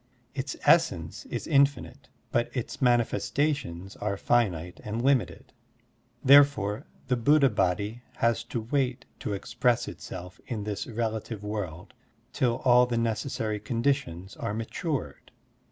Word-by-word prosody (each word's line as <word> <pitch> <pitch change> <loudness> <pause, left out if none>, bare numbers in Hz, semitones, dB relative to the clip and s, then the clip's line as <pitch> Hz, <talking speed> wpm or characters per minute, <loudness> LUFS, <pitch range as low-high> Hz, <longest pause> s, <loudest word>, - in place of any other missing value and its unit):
Its 135 -1 -3
essence 85 - +2
is - - -4
infinite, 140 -2 +1 0.2
but 120 0 +1
its 125 - -4
manifestations 120 - 0
are 100 -1 -2
finite 90 -8 0
and 110 +3 -3
limited. 135 -2 +1 0.7
Therefore, 135 -7 +5 0.2
the 125 - +2
Buddha 140 +2 +4
Body 105 +4 0
has 115 -1 +1
to 115 - -3
wait 125 +1 -1
to 105 - -3
express 120 +4 0
itself 90 0 -8
in 110 -5 -3
this 105 -1 -4
relative 110 -2 -3
world 100 -4 -5 0.4
till 125 -4 0
all 125 0 +6
the 120 -1 -1
necessary 110 -1 -1
conditions 115 -5 -1
are 105 - -3
matured. 135 +6 -4
115 Hz, 120 wpm, -28 LUFS, 105-130 Hz, 0.7 s, all